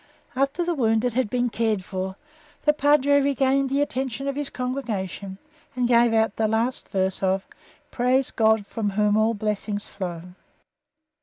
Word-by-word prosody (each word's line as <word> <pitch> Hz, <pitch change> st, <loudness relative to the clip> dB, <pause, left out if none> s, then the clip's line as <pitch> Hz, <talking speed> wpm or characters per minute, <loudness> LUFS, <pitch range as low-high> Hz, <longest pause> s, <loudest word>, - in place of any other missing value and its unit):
After 275 Hz, +6 st, 0 dB
the 345 Hz, -, 0 dB
wounded 230 Hz, -3 st, +1 dB
had 255 Hz, -3 st, 0 dB
been 245 Hz, 0 st, 0 dB
cared 220 Hz, -4 st, 0 dB
for, 190 Hz, 0 st, -4 dB, 0.5 s
the 300 Hz, -, +4 dB
Padre 285 Hz, -1 st, +4 dB
regained 275 Hz, 0 st, +2 dB
the 280 Hz, +2 st, +2 dB
attention 265 Hz, -1 st, -3 dB
of 275 Hz, -, -1 dB
his 290 Hz, -1 st, -3 dB
congregation 210 Hz, -7 st, -4 dB, 0.4 s
and 250 Hz, -1 st, +1 dB
gave 235 Hz, -1 st, +4 dB
out 220 Hz, -2 st, +1 dB
the 220 Hz, -, +2 dB
last 225 Hz, +4 st, -1 dB
verse 190 Hz, -1 st, -1 dB
of 190 Hz, 0 st, 0 dB, 0.5 s
"Praise 255 Hz, +2 st, +1 dB
God 220 Hz, -2 st, +2 dB
from 210 Hz, 0 st, -2 dB
Whom 210 Hz, +1 st, +2 dB
all 220 Hz, +1 st, +2 dB
blessings 210 Hz, 0 st, -2 dB
flow." 175 Hz, -4 st, -6 dB
230 Hz, 155 wpm, -24 LUFS, 205-270 Hz, 0.5 s, the